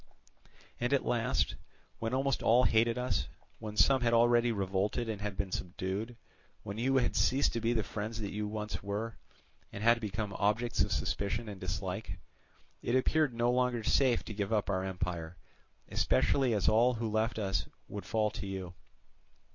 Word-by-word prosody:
And 120 +3 0
at 140 - +2
last, 115 -2 +1 0.5
when 115 0 -2
almost 135 0 0
all 120 +3 +5
hated 115 0 +3
us, 125 +1 -1 0.3
when 105 -1 -7
some 135 +2 +5
had 115 -1 +3
already 120 0 +4
revolted 100 +3 -1
and 105 -2 -4
had 105 -2 -4
been 100 -2 -2
subdued, 95 +7 -4 0.5
when 100 +2 -6
you 135 +3 +2
had 125 -2 +1
ceased 135 +2 +3
to 115 - -2
be 115 +1 +1
the 110 -2 +1
friends 110 +3 -5
that 100 -3 -4
you 105 0 -3
once 105 0 -4
were, 105 +3 -4 0.5
and 100 - -6
had 115 +1 +5
become 105 -1 -3
objects 105 +4 +1
of - - +1
suspicion 105 +3 -1
and 100 -3 -8
dislike, 95 +1 -4 0.6
it 120 - 0
appeared 140 0 +2
no 120 +1 +2
longer 125 -2 +1
safe 125 +2 +3
to 110 - -6
give 100 0 -3
up 105 -2 +1
our 95 -1 0
empire; 90 -3 -4 0.5
especially 130 -5 +2
as 100 - 0
all 120 +3 +4
who 115 0 -2
left 110 +2 0
us 100 -3 -1 0.2
would 100 -3 -7
fall 110 -1 +1
to 100 - -6
you. 95 -2 -5
110 Hz, 175 wpm, -32 LUFS, 100-120 Hz, 0.6 s, all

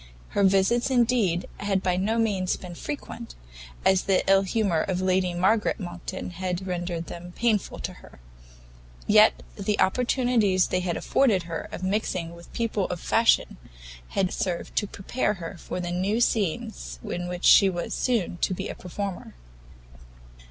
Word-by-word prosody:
Her 200 - +1
visits, 195 +6 +3
indeed, 235 -8 +2
had 195 -2 0
by 180 -1 +1
no 205 +5 0
means 200 -5 +1
been 180 -2 -9
frequent, 145 - -7 0.5
as 190 0 +5
the 190 -2 +2
ill 195 0 +6
humour 195 -4 +1
of 185 -2 -1
Lady 185 -1 +1
Margaret 205 +5 +2
Monckton 180 0 -6
had 180 +1 -3
rendered 175 -2 -3
them 175 +1 -9
painful 225 -5 0
to - - -4
her; - - -16 0.9
yet - - +5
the 210 - -1
opportunities 235 -3 +2
they 185 - +1
had 180 -2 -2
afforded 215 -10 +2
her 165 -1 -5
of - - -6
mixing 185 -4 -1
with 170 0 -14
people 225 -4 -1
of 180 - -4
fashion, 225 +6 +2 0.5
had 185 - -1
served 175 -2 -3
to 205 - +2
prepare 210 +2 -2
her 175 0 -7
for - - -5
the 175 -1 -3
new 190 +5 0
scenes 155 - -1
in 175 0 -4
which 180 0 -4
she 195 - +8
was 175 -2 -3
soon 225 -8 0
to 185 - 0
be - - -4
a - - -4
performer. 185 - -6
185 Hz, 160 wpm, -26 LUFS, 175-210 Hz, 0.9 s, she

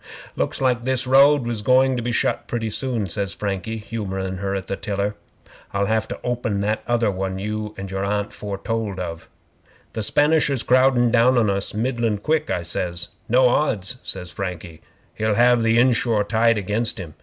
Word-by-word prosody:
'"Looks - - -2
like 125 -3 +1
this 130 0 0
road 135 +1 +5
was 115 -3 -2
going 130 +3 +4
to 120 - -2
be 120 +1 -2
shut 115 - 0
pretty 115 -2 -2
soon," 120 -4 -2
says 100 +2 -3
Frankie, 100 +2 -3
humourin' 95 -4 -4
her 100 +1 -2
at 95 - -4
the - - -3
tiller. 100 +1 -2 0.6
"I'll 100 0 +2
have 110 +1 0
to - - -6
open 120 -4 -1
that 105 +2 0
other 120 -3 +2
one 95 0 -3
your 105 +2 -4 0.3
Aunt 105 +1 -1
foretold 105 0 -4
of." 85 -2 -6 0.6
'"The 110 - -3
Spanisher's 145 +1 +2
crowdin' 130 -2 +4
down 125 +2 +4
on 110 -4 +3
us 100 +1 -2
middlin' 115 -1 0
quick," 155 +8 0
I 85 - -1
says. 85 0 -3 0.2
"No 125 +2 +5
odds," 125 -4 0
says 90 -2 -6
Frankie, 90 -4 -6 0.3
"he'll 110 -1 0
have 120 +1 +4
the 115 0 +3
inshore 120 -3 +3
tide 115 +2 +2
against 105 +4 -1
him. 85 -6 -7
110 Hz, 175 wpm, -22 LUFS, 100-120 Hz, 0.6 s, road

